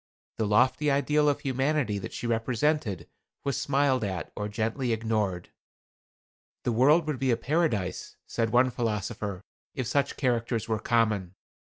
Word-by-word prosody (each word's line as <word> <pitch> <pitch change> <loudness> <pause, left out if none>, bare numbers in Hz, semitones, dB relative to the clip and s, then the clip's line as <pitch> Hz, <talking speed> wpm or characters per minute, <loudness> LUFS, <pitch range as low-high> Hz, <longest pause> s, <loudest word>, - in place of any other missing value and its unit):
The 110 - +1
lofty 130 +7 +3
ideal 150 +1 +3
of 145 0 -1
humanity 135 -4 0
that 95 - -6
she - - -6
represented 120 - 0 0.4
was 140 -1 -1
smiled 135 -3 +2
at 95 -4 -3
or 105 - -3
gently 115 +3 -1
ignored. 110 -5 -1 1.1
"The 120 - 0
world 145 +8 +4
would 150 -4 -2
be 135 - +1
a 115 - +3
paradise," 125 - -1
said 115 -1 -1
one 125 +3 +4
philosopher, 105 -4 -3 0.3
"if 130 - -2
such 140 +4 0
characters 120 -3 0
were 110 -2 0
common. 105 -6 +1
120 Hz, 145 wpm, -28 LUFS, 110-140 Hz, 1.1 s, world